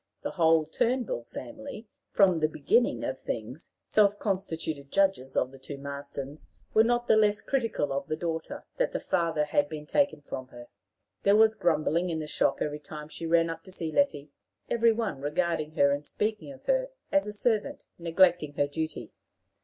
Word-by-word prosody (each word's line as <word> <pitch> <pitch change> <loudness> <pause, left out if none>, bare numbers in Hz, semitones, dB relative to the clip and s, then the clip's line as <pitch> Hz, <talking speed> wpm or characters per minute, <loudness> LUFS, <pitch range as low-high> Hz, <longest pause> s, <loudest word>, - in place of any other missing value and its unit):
The - - -2
whole 160 -2 +4
Turnbull 230 - -1
family, 275 - -8 0.2
from 185 -5 +4
the 155 - +3
beginnings 190 - +1
of 130 0 -3
things 120 +7 -5 0.2
self 205 -1 +3
constituted 165 -8 -3
judges 190 -10 +1
of 130 - +1
the 135 - -13
two 140 +2 -7
Marstons, 140 +1 -7 0.3
were 220 - +6
not 240 +1 +1
the - - +6
less 210 0 +3
critical 230 - 0
of 140 - -3
the 155 - -1
daughter, 165 -1 -4
that - - 0
the - - -1
father 165 -4 0
had 145 -1 +1
been 150 -1 -6
taken 285 - +1
from 130 -2 -6
her. 120 -1 -12 0.5
There 200 +1 +4
was 220 0 +6
grumbling 170 -3 +1
in 165 - -1
the 155 - -3
shop 150 - +1
every 150 0 -3
time 150 0 -9
she 165 - -5
ran 165 0 +4
up 165 0 -6
to 185 - -12
see 165 -3 -4
Letty, 150 - +1 0.4
every 230 -1 +4
one 220 -11 -2
regarding 155 +1 -1
her 140 -2 +4
and 145 +1 -1
speaking 215 - -3
of 270 - -14
her - - +1 0.2
as 290 -5 +3
a - - -3
servant 210 +1 -1
neglecting 170 -2 +3
her 145 - +2
duty. 150 -5 -4
165 Hz, 185 wpm, -28 LUFS, 150-215 Hz, 0.5 s, were